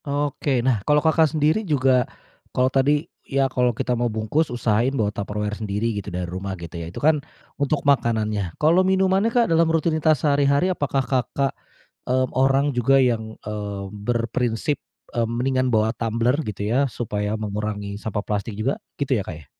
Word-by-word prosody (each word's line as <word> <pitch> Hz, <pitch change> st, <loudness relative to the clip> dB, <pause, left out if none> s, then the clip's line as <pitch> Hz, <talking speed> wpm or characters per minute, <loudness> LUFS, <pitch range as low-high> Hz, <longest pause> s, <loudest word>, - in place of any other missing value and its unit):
Oke, 140 Hz, -3 st, -1 dB
nah 120 Hz, -6 st, +2 dB
kalau, 150 Hz, +8 st, +2 dB
Kakak, 160 Hz, +1 st, +3 dB
sendiri 155 Hz, +6 st, +2 dB
juga 135 Hz, -, +2 dB, 0.4 s
kalau 130 Hz, +1 st, +1 dB
tadi 145 Hz, +3 st, +2 dB, 0.2 s
ya 135 Hz, -1 st, 0 dB
kalau 125 Hz, -1 st, +3 dB
kita 120 Hz, +1 st, -1 dB
mau 120 Hz, 0 st, 0 dB
bungkus 110 Hz, +9 st, 0 dB
usahain 120 Hz, 0 st, +1 dB
bawa 105 Hz, -3 st, 0 dB
Tupperware 105 Hz, +1 st, -3 dB
sendiri 105 Hz, +2 st, -1 dB
gitu 100 Hz, -2 st, -5 dB
dari 90 Hz, 0 st, -3 dB
rumah 95 Hz, +2 st, -5 dB
gitu 85 Hz, -1 st, -9 dB
ya. 80 Hz, -, -6 dB
Itu 85 Hz, -, -11 dB
kan 150 Hz, 0 st, +3 dB, 0.4 s
untuk 145 Hz, +1 st, 0 dB
makanannya, 110 Hz, -8 st, +1 dB
kalau 165 Hz, +4 st, +4 dB
minumannya, 190 Hz, +2 st, +2 dB
Kak, 235 Hz, 0 st, +3 dB
dalam 165 Hz, -3 st, +3 dB
rutinitas 160 Hz, -2 st, +2 dB
sehari-hari 145 Hz, +5 st, +3 dB
apakah, 140 Hz, -5 st, -1 dB
Kakak, 135 Hz, +1 st, 0 dB, 0.6 s
eee, 130 Hz, 0 st, +2 dB
orang 135 Hz, +2 st, +2 dB
juga 135 Hz, +3 st, +4 dB
yang, 110 Hz, -3 st, 0 dB
eee, 105 Hz, -2 st, -4 dB
berprinsip, 115 Hz, +4 st, -1 dB, 0.4 s
mmm, 115 Hz, -3 st, 0 dB
mendingan 130 Hz, +2 st, 0 dB
bawa 110 Hz, 0 st, +3 dB
tumbler 115 Hz, +2 st, +1 dB, 0.2 s
gitu 100 Hz, 0 st, -4 dB
ya, 130 Hz, +6 st, +2 dB
supaya 105 Hz, -2 st, -3 dB
mengurangi 105 Hz, -1 st, -4 dB
sampah 105 Hz, -1 st, -2 dB
plastik 105 Hz, +1 st, -2 dB
juga 130 Hz, +6 st, 0 dB, 0.2 s
gitu 140 Hz, -1 st, +1 dB
ya, -, -, -6 dB
Kak, 90 Hz, -, -6 dB
ya? 75 Hz, -, -14 dB
125 Hz, 170 wpm, -23 LUFS, 105-145 Hz, 0.6 s, kalau